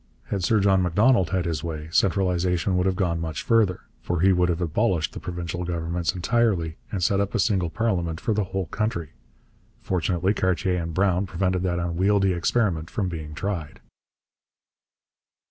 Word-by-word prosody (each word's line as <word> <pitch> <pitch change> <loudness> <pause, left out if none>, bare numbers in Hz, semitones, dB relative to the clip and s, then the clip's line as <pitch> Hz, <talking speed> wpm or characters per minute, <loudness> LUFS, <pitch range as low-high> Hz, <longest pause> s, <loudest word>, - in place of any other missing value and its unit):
Had 100 -3 -2
Sir 110 +4 +3
John 95 -1 +3
Macdonald 95 +3 +3
had 95 -2 0
his 80 -3 -2
way, 80 -2 -5
centralization 90 0 +1
would 90 +1 +2
have 95 - +1
gone 85 -4 0
much 80 -3 -4
further, 110 -6 +2 0.2
for 90 -2 -2
he 95 +1 +5
would 90 0 +2
have 85 -1 0
abolished 90 0 0
the - - -6
provincial 90 0 -4
governments 85 +1 -2
entirely 90 -5 +1
and 95 -5 -2
set 100 +3 +2
up 100 +3 -1
a - - +1
single 95 -5 +1
parliament 85 -6 -1
for 110 - 0
the 105 -1 0
whole 95 0 -3
country. 105 -5 -3 0.7
Fortunately 90 +1 0
Cartier 95 -2 0
and 80 -1 -5
Brown 95 0 +2
prevented 90 +1 0
that 90 -1 0
unwieldy 95 +3 +2
experiment 85 -2 0
from 95 -3 -2
being 80 -3 -6
tried. 85 -4 -4
90 Hz, 165 wpm, -25 LUFS, 85-100 Hz, 0.7 s, he